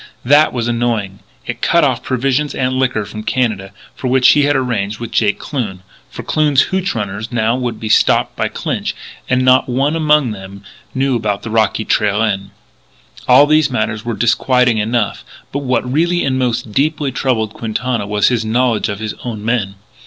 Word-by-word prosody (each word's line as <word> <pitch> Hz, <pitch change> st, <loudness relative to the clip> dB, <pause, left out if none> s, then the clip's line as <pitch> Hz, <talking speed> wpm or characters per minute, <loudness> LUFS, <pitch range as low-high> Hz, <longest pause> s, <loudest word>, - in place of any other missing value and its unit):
That 145 Hz, +4 st, +5 dB
was 120 Hz, -2 st, -2 dB
annoying; 115 Hz, -5 st, -1 dB, 0.3 s
it -, -, -5 dB
cut -, -, +3 dB
off -, -, +1 dB
provisions 135 Hz, +3 st, -1 dB
and 130 Hz, -1 st, 0 dB
liquor 130 Hz, -5 st, 0 dB
from 110 Hz, -, -8 dB
Canada, 110 Hz, -5 st, -1 dB, 0.2 s
for 130 Hz, -, -5 dB
which 130 Hz, 0 st, +4 dB
he 145 Hz, -1 st, +4 dB
had 145 Hz, 0 st, +2 dB
arranged 110 Hz, -6 st, -1 dB
with 115 Hz, -1 st, -6 dB
Jake 105 Hz, -2 st, +1 dB
Kloon. 105 Hz, -10 st, -5 dB, 0.3 s
For -, -, -8 dB
Kloon's 150 Hz, -3 st, +2 dB
hootch 190 Hz, -3 st, -1 dB
runners 105 Hz, +1 st, -4 dB
now 115 Hz, 0 st, +1 dB
would 120 Hz, -3 st, -3 dB
be 110 Hz, -, -5 dB
stopped -, -, +3 dB
by -, -, -1 dB
Clinch; -, -, -3 dB, 0.3 s
and 125 Hz, 0 st, +2 dB
not 130 Hz, 0 st, +4 dB
one 135 Hz, +5 st, 0 dB
among 150 Hz, -5 st, +2 dB
them 100 Hz, -1 st, -9 dB, 0.3 s
knew 135 Hz, 0 st, +1 dB
about 105 Hz, -3 st, -2 dB
the 115 Hz, -, -6 dB
rocky 110 Hz, -1 st, +1 dB
trail 105 Hz, 0 st, +1 dB
in. 100 Hz, -3 st, -1 dB, 0.8 s
All 130 Hz, +3 st, +7 dB
these 155 Hz, -1 st, +3 dB
matters 110 Hz, -3 st, -2 dB
were 120 Hz, -1 st, -3 dB
disquieting 125 Hz, 0 st, +2 dB
enough: 110 Hz, 0 st, -1 dB, 0.3 s
but 140 Hz, -, -2 dB
what 125 Hz, -3 st, -1 dB
really 175 Hz, +3 st, +1 dB
and 130 Hz, -1 st, 0 dB
most 120 Hz, -3 st, -1 dB
deeply 145 Hz, +3 st, 0 dB
troubled 115 Hz, -5 st, -1 dB
Quintana 115 Hz, -1 st, -3 dB
was 105 Hz, 0 st, +2 dB
his 120 Hz, -3 st, 0 dB
knowledge 115 Hz, 0 st, 0 dB
of 100 Hz, -, -3 dB
his 110 Hz, 0 st, -4 dB
own 110 Hz, -4 st, -5 dB
men. 110 Hz, -5 st, -1 dB
120 Hz, 180 wpm, -16 LUFS, 110-130 Hz, 0.8 s, All